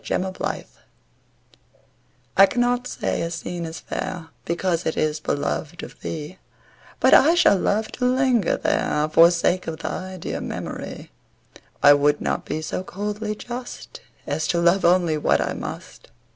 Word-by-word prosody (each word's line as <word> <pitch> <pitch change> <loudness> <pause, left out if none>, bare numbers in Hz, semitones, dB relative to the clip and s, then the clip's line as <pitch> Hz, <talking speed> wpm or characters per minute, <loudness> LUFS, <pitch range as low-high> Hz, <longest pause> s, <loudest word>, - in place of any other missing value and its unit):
IMPARTIALITY 185 0 -3 1.7
I 195 - +9
cannot 245 +1 0
say - - -2
a 165 - -2
scene 170 0 -5
is 160 0 -7
fair 165 -3 -5 0.2
Because 170 0 -1
it 160 - -2
is 155 0 0
beloved 155 +2 -3
of - - -10
thee 160 +3 -6 0.6
But - - +5
I 320 +5 +7
shall 200 - +5
love 215 +4 0
to 250 - -2
linger 255 -5 +2
there, 150 0 0
For 170 +1 +8
sake 175 +1 0
of 160 -1 -4
thy 185 +3 -5
dear 165 - -4
memory; - - -6 0.7
I 145 - +9
would 145 +1 +2
not - - -2
be 155 - -3
so 155 - -3
coldly 210 +3 -4
just 245 +3 -8 0.2
As 155 - -2
to 170 - +1
love 175 +3 +3
only 170 -3 +3
what - - +2
I - - -1
must. - - -8
175 Hz, 150 wpm, -23 LUFS, 160-210 Hz, 1.7 s, I